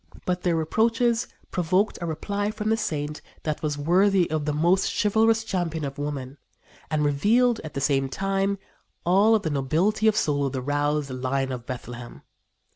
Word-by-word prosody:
But 180 0 -1
their 175 -2 +1
reproaches 230 +8 +1 0.2
provoked 185 +4 +1
a 170 - -2
reply 200 +6 -2
from 215 0 -3
the - - +4
saint 150 -7 -3 0.2
that 155 -2 -2
was 150 -2 -2
worthy 180 +5 +3
of 155 -2 -1
the 150 - 0
most 170 +6 +2
chivalrous 220 +2 +3
champion 170 -7 -2
of 140 +1 -6
woman, 140 -2 -4 0.5
and 150 -1 +1
revealed, 220 - +3
at 155 -3 -8
the 140 - -2
same 135 -1 +1
time, 195 +4 0 0.5
all 200 +6 +5
the 165 -7 -3
nobility 165 +11 +1
of 215 - +4
soul 145 -5 +1
of 135 - -5
the 130 - -2
roused 145 0 0
"Lion 130 +1 -1
of 120 -2 -6
Bethlehem." 120 -1 -7
160 Hz, 170 wpm, -25 LUFS, 145-205 Hz, 0.5 s, all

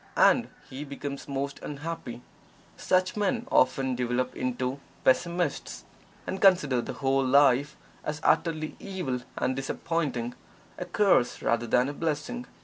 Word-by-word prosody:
And - - +5 0.2
he 135 +3 -7
becomes 140 -1 -6
most 140 0 -3
unhappy. 145 -5 -6 0.5
Such 185 0 +1
men 215 +3 0
often 130 0 +3
develop 125 +1 -1
into 125 +1 -2 0.2
Pessimists, 170 +3 0 0.4
and 190 - -4
consider 165 -11 +5
the - - -5
whole 135 0 +1
of 130 - 0
life 140 +1 +4 0.3
as 150 0 -3
utterly 155 -1 +1
evil 180 -11 -3 0.2
and 130 - 0
disappointing 135 -3 -2 0.5
a 180 - -3
curse 180 -9 +2
rather 115 0 +1
than 125 +3 +3
a 145 - -3
blessing. 165 +12 -3
140 Hz, 135 wpm, -28 LUFS, 130-170 Hz, 0.5 s, And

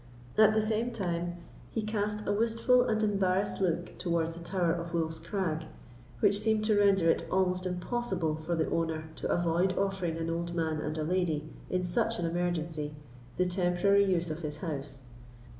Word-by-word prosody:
At 215 0 +6
the 215 - +3
same 220 +2 0
time 175 -6 -2 0.3
he 225 - -2
cast 210 0 -2
a - - 0
wistful 230 +4 +3
and 220 -2 +1
embarrassed 195 -1 +1
look 175 -2 -1
towards 165 -2 0
the 170 - -8
Tower 175 -1 +1
of 170 0 -4
Wolf's 160 -1 -1
Crag, 175 -6 -2 0.6
which 205 -1 +4
seemed 220 -1 +1
to 215 -1 +3
render 195 -4 +4
it - - -2
almost 185 -1 +1
impossible 180 -2 -1
for 155 +2 -2
the 160 -1 0
owner 160 -1 0
to - - -3
avoid 175 +2 +1
offering 190 -4 -1
an 165 0 -2
old 170 +1 -3
man 160 -2 0
and 155 +1 -3
a 155 - -1
lady, 160 -3 0 0.2
in 185 0 0
such 225 +6 0
an 175 - -1
emergency, 165 -3 -2 0.4
the 180 - +3
temporary 180 +2 +3
use 175 -3 +1
of 155 - -4
his 150 -3 -5
house. 140 -5 -5
175 Hz, 175 wpm, -30 LUFS, 165-200 Hz, 0.6 s, At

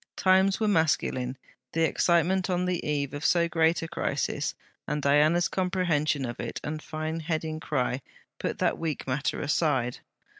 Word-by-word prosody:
Times 190 +1 +4
were 220 - +1
masculine; 140 -8 +1 0.4
the 165 - +2
excitement 175 +3 +2
on 180 0 +1
the 180 -1 -1
eve 145 -2 -1
of 145 +1 -5
so 170 +2 +3
great 165 0 +2
a - - -3
crisis, 170 0 -2 0.3
and 150 +1 -1
Diana's 150 +5 +4
comprehension 170 -7 0
of 120 0 -6
it - - -4
and 155 +1 -4
fine 155 +1 -4
heading 160 -1 -2
cry, 130 -3 -1 0.4
put - - -2
that - - 0
weak 160 -3 -3
matter 135 +2 -1
aside. 145 -5 0
160 Hz, 155 wpm, -27 LUFS, 145-175 Hz, 0.4 s, Times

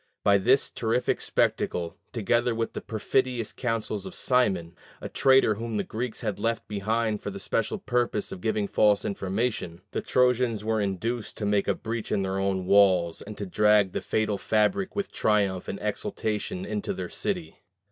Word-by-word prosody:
By 100 -1 +5
this 130 +8 +3
terrific 115 +2 0
spectacle, 85 -1 0 0.2
together 120 +1 +1
with 115 0 -2
the - - -5
perfidious 120 +1 -1
counsels 115 -5 -2
of - - -9
Simon 95 -10 +1 0.2
a - - -5
traitor 135 -5 +4
whom 115 +1 -4
the 100 - 0
Greeks 115 +2 -4
had 105 -4 -3
left 115 -1 -1
behind 110 +1 -1
for - - -4
the - - -7
special - - -1
purpose 120 -4 -1
of 90 - -7
giving 110 -1 0
false 105 -1 +3
information 100 -3 -2
the - - -2
Trojans 125 -4 +2
were 110 -1 +1
induced 105 +4 -3
to 105 - -3
make 100 -1 +1
a - - +2
breach 115 0 -5
in 100 - +1
their 95 0 -1
own 95 -1 0
walls, 95 -4 +4
and 105 0 -9
to 100 - -4
drag 105 0 +4
the - - -3
fatal 110 -2 0
fabric 185 - +1
with 200 -1 -2
triumph 100 -4 +1
and - - -4
exultation 145 - -3
into 205 -1 -3
their - - -4
city. 180 -5 -3
110 Hz, 175 wpm, -27 LUFS, 100-120 Hz, 0.2 s, By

